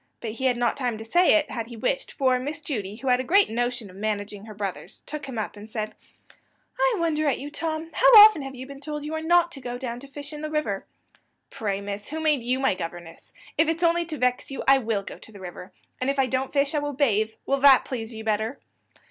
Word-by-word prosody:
but 225 - -4
he 230 +4 -4
had 250 -2 +3
not 240 0 +1
time 245 -5 -2
to 220 - -8
say 350 +11 +4
it, 315 -1 +1
had 230 -2 -4
he 235 -1 -10
wished; - - -1
for 260 -2 +2
Miss 290 +4 -4
Judy, 210 -9 -4
who 265 +4 -8
had 250 0 +4
a - - -1
great 390 - +4
notion 240 -1 -2
of 185 - -14
managing 205 0 -3
her 215 -1 -10
brothers, 200 -2 -6
took 300 -2 -6
him 255 -3 -6
up, 215 - -3
and 210 +1 -11
said: 215 -1 -4 0.9
"I - - +3
wonder 315 -3 0
at 275 - +2
you, 290 +2 -7
Tom. 320 +1 -4
How - - +4
often 420 -6 +9
have 270 -1 -7
you 255 +1 -7
been 275 0 -10
told 295 0 -5
that - - -6
you 305 - -4
are 315 - -2
not 345 +1 +3
to 275 - -10
go 245 -1 -5
down 245 -2 -5
to 280 - -11
fish 285 +2 -9
in 300 - -7
the 310 - -4
river?" 285 -11 -2 0.6
"Pray, 200 -2 -2
miss, 200 0 -6
who 315 +2 -4
made 305 -4 +2
you 250 +2 0
my 265 -5 +2
governess? 170 -1 -8 0.3
If 320 - +5
it's 330 +2 -1
only 340 0 +2
to 310 -2 -5
vex 250 -1 0
you, 270 - -5
I 270 0 +7
will 220 -5 -1
go - - -9
to - - -13
the 205 - -12
river 180 0 -9 0.3
if 275 +2 0
I 270 - +4
don't 260 +1 -2
fish 280 +1 +1
I 300 - +2
will 290 0 -3
bathe. 220 -6 +1
Will 275 0 +1
that 270 -1 +7
please 230 -3 -5
you 220 -1 -8
better?" 220 +4 -1
260 Hz, 255 wpm, -25 LUFS, 220-300 Hz, 0.9 s, often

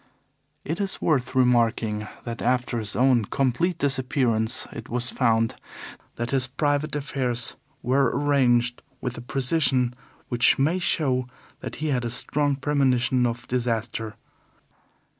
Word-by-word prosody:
It 165 +7 -2
is 195 -1 -2
worth 135 -7 0
remarking 115 -4 +2 0.2
that 115 -1 -6
after 125 -1 0
his 105 -3 -3
own 125 -1 +3
complete 140 - 0
disappearance 130 -5 +1
it - - -8
was 120 +1 0
found 115 -2 +2 0.6
that 120 +1 -3
his 130 -2 +2
private 145 +3 -1
affairs 130 -4 -1 0.3
were 130 0 +3
arranged 125 -4 +2 0.2
with 125 -1 -4
a - - -8
precision 130 -1 +1 0.3
which 120 -1 +3
may 160 +7 +1
show 130 -8 0 0.3
that - - -7
he 155 0 -3
had 125 -3 0
a 120 - -2
strong 145 +4 +1
premonition 130 -3 +2
of 115 0 -5
disaster. 115 -3 -2
125 Hz, 130 wpm, -25 LUFS, 120-140 Hz, 0.6 s, own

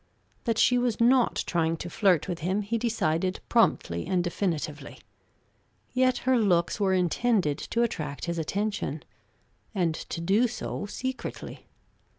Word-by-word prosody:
That 230 -3 +1
she 250 +1 +4
was 245 -3 0
not 245 +1 +3
trying 165 -1 0
to 170 - -6
flirt 185 -4 +2
with 175 -2 -3
him 185 +5 -1
he 230 +3 -1
decided 185 -6 0
promptly 85 - +2
and 180 -2 +1
definitively; 160 -5 -3 1.0
yet 255 0 +3
her 260 -1 +4
looks 180 -3 +2
were 190 -2 +2
intended 180 -3 +1
to 235 - 0
attract 150 -11 -3
his 170 -1 -2
attention, 175 -4 -2 0.7
and 175 -4 +1
to 160 - -6
do 200 +8 +3
so 220 -3 -5
secretly. 260 +4 -6
190 Hz, 140 wpm, -27 LUFS, 165-230 Hz, 1.0 s, she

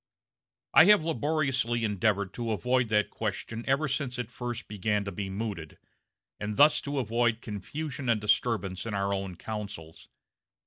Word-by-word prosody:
I 160 - +9
have 205 -5 +6
laboriously 140 -7 0
endeavored 100 -2 +1
to 115 -2 -2
avoid 125 +3 +1
that 105 -1 +2
question 115 +1 -4
ever 140 +3 +2
since 135 -3 -2
it 120 -2 -4
first 120 -2 -5
began 105 0 -1
to 100 - -4
be 95 +1 -4
mooted, 95 -6 -5 0.6
and 105 0 -4
thus 150 +2 +6
to 145 0 -4
avoid 120 -2 +1
confusion 130 - -5
and 115 -2 +3
disturbance 105 -2 0
in 105 - -3
our 100 0 0
own 95 -2 -3
councils. 100 -5 -7
115 Hz, 150 wpm, -29 LUFS, 100-130 Hz, 0.6 s, I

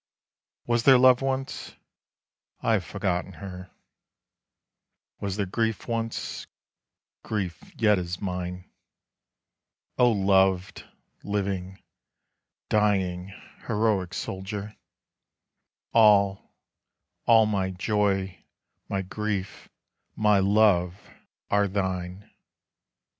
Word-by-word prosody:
Was 120 -1 +1
there 130 +1 +7
love 125 0 +6
once? 135 0 -3 0.8
I - - +1
have - - +1
forgotten 95 -1 -2
her. 90 +2 -9 1.5
Was 100 -2 -3
there 100 - 0
grief 110 +2 -2
once? 115 -1 -3 0.7
grief 95 -6 -4
yet 105 -3 +4
is 90 0 -5
mine. 90 -1 -4 1.3
O 125 -1 +6
loved, 95 -2 +2 0.4
living, 95 -2 -3 0.8
dying, 95 -4 +1 0.4
heroic 105 -4 0
soldier, 100 +2 -5 1.2
All, 100 -3 +4 0.8
all, 115 -1 +6
my 100 -3 0
joy, 95 0 -1 0.5
my 95 -1 -1
grief, 100 0 -4 0.5
my 105 -2 +3
love, 95 -3 +3 0.6
are 100 0 +3
thine! 95 0 -3
100 Hz, 85 wpm, -26 LUFS, 95-105 Hz, 1.5 s, there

